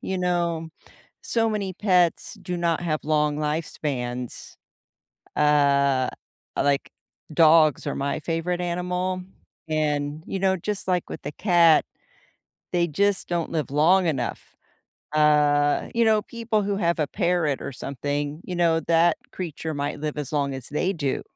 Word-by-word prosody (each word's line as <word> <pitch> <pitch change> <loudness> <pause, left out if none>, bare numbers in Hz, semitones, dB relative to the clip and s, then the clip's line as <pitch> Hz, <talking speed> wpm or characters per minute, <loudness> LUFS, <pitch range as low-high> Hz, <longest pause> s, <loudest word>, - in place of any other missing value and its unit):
You 190 - -3
know, 170 -2 -1 0.5
so 225 -1 +1
many 200 -4 -3
pets 180 -4 +2
do 180 -1 -3
not 170 -1 0
have 155 -3 -2
long 150 -1 +1
lifespans. 140 -5 -4 0.8
Uh, 140 -3 +3 0.5
like, 140 -1 +1 0.4
dogs 155 -2 +5
are - - -1
my 140 +2 -2
favorite 170 +3 -2
animal, 180 +1 -2 0.5
and, 150 -1 -1
you 195 - -3
know, 190 0 +2
just 200 +2 -4
like 180 -2 0
with - - -7
the 145 - -4
cat, 170 -3 +4 0.9
they 175 -1 +2
just 200 +5 0
don't 170 -2 -2
live 155 -4 -2
long 175 +6 +4
enough. 135 -7 -3 0.6
Uh, 150 -1 +3
you 230 0 +3
know, 215 -1 +3
people 230 -2 -2
who 200 0 -1
have 170 -4 +1
a 150 - +1
parrot 175 -7 0
or - - -5
something, 145 +3 -4
you 180 - -5
know, 165 -2 +3
that 165 0 +3 0.2
creature 160 -3 -5
might 145 0 -3
live 150 -1 -3
as 145 0 -5
long 140 -2 0
as 130 -1 -7
they 165 +6 0
do, 145 -6 -2
160 Hz, 145 wpm, -24 LUFS, 145-180 Hz, 0.9 s, dogs